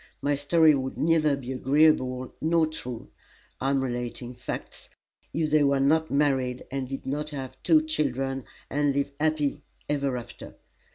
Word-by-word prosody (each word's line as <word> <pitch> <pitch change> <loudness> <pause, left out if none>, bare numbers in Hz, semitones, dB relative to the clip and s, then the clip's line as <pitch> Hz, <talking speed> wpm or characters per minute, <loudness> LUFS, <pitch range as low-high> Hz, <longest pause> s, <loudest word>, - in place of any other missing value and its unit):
My 145 - +1
story 155 +2 +4
would 130 -1 -2
neither 155 -3 +3
be 130 -2 -6
agreeable 130 -2 +2
nor 165 +1 +3
true 125 -7 -7 0.5
(I 135 - 0
am 135 -1 +1
relating 120 0 -4
facts) 125 0 -7 0.4
if 155 -1 -1
they 155 -1 +5
were 140 -1 +3
not 160 +4 +3
married, 135 -3 +1
and 135 -1 -3
did 135 - -6
not 150 +3 -2
have 135 -3 -7
two 315 -1 +4
children, 135 - -1 0.2
and 145 0 +1
live 140 0 0
happy 150 -2 0 0.3
ever 140 -3 0
after. 120 - -9
140 Hz, 155 wpm, -27 LUFS, 130-150 Hz, 0.5 s, they